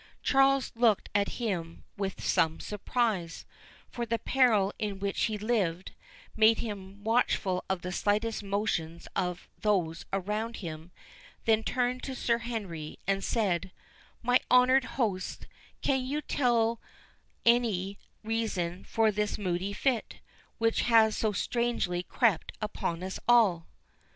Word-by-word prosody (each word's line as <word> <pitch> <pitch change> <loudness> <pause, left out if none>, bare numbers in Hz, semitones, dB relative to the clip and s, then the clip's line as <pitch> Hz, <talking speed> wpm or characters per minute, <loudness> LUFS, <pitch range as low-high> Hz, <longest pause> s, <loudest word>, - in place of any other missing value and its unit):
Charles 270 -1 +3
looked 230 -3 +2
at 200 0 +1
him 175 -8 -3
with 195 -1 -4
some 160 0 +2
surprise; 210 -4 -2 0.4
for 240 - -5
the 230 0 0
peril 225 -5 +3
in 205 -2 -2
which 200 0 0
he 215 -1 -2
lived, 200 -5 -1 0.4
made 220 +1 +5
him 200 -2 -6
watchful 210 -5 +1
of 190 -2 -1
the 180 - -3
slightest 215 +4 0
motions 195 -5 -2
of 180 -1 -2
those 180 -6 0
around 210 +4 -2
him—then 215 - -4
turned 250 +2 0
to 265 - -5
Sir 235 -1 +1
Henry, 200 -10 -5
and 195 0 0
said, 190 -5 0 0.5
"My 245 +1 +4
honoured 250 +1 +5
host, 200 -8 -1 0.4
can 265 -2 +2
you 285 +4 -2
tell 235 -3 +1 0.6
any 215 -5 +2 0.2
reason 205 -6 -2
for 225 -1 +2
this 210 0 -1
moody 185 0 -2
fit, 240 +2 -1 0.4
which 225 -1 +2
has 225 -2 +5
so 220 - +1
strangely 220 -4 -1
crept 215 0 +1
upon 180 -5 -3
us 190 0 -4
all?" 210 -9 +4
210 Hz, 125 wpm, -29 LUFS, 185-235 Hz, 0.6 s, made